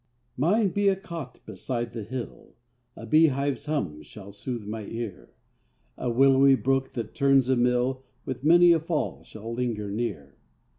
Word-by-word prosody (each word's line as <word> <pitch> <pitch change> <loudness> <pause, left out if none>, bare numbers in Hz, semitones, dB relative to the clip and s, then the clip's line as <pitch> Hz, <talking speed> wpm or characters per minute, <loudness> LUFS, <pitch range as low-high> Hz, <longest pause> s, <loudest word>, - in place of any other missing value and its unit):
Mine 195 - +2
be 205 +3 0
a 195 - +4
cot 165 -9 -8
beside 115 +3 -4
the 115 - -5
hill, 120 +3 -7 0.4
A 115 - -9
bee 155 +8 +5
hive's 140 +1 -2
hum 95 - -2
shall 100 +4 -12
sooth 110 +2 -5
my 105 0 -5
ear; 115 -5 -6 0.7
A 125 - -3
willowy 135 +2 +5
brook, 135 0 0
that 115 -3 -5
turns 135 -2 +3
a 130 - +4
mill, 125 +2 +1 0.2
With 130 0 -5
many 175 +3 +7
a 165 - +4
fall 160 -1 -2
shall 110 +2 -8
linger 115 -4 -2
near. 100 - -4
125 Hz, 160 wpm, -26 LUFS, 115-145 Hz, 0.7 s, many